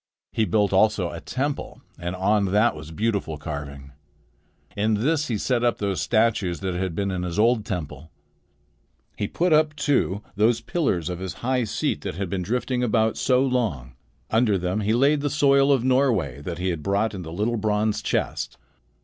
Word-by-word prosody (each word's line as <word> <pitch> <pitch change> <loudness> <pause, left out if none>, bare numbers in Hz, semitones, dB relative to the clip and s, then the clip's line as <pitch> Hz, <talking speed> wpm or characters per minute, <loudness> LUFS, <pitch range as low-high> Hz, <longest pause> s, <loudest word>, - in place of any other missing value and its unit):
He 110 - +1
built 105 -2 +1
also 95 -3 +3
a 85 - -7
temple, 140 +7 -3 0.2
and 90 +1 -4
on 100 +2 +2
that 105 +3 +2
was 75 0 -9
beautiful 100 -3 -2
carving. 70 -2 -7 0.8
In 110 +1 +1
this 150 +8 +1
he 115 - -1
set 120 +3 0
up 120 -1 +2
those 100 -6 -1
statues 105 -3 +1
that 95 -2 -2
had 90 -1 -2
been 100 +1 -1
in 90 -1 -2
his 90 -1 -4
old 110 0 +3
temple. 80 - -5 1.1
He 105 - -2
put 175 - +1
up, 155 0 +3
too, 130 -9 0
those 110 +3 +3
pillars 115 - -1
of 90 -1 -4
his 95 -1 -5
high 130 -2 +1
seat 105 - -2
that - - -5
had 95 -1 -4
been 95 -2 -1
drifting 125 +5 -1
about 110 -2 +2
so 130 0 +2
long. 110 - -1 0.4
Under 110 -3 +3
them 90 +3 -1
he 110 +2 +1
laid 140 +4 +3
the 145 - 0
soil 140 -1 +4
of 135 -4 +3
Norway 125 - +1
that 85 +2 -5
he 90 +1 -1
had 85 -3 -3
brought 100 +5 0
in 95 - -5
the 80 -2 -8
little 105 +7 -1
bronze 105 0 0
chest. - - -2
105 Hz, 185 wpm, -24 LUFS, 90-125 Hz, 1.1 s, soil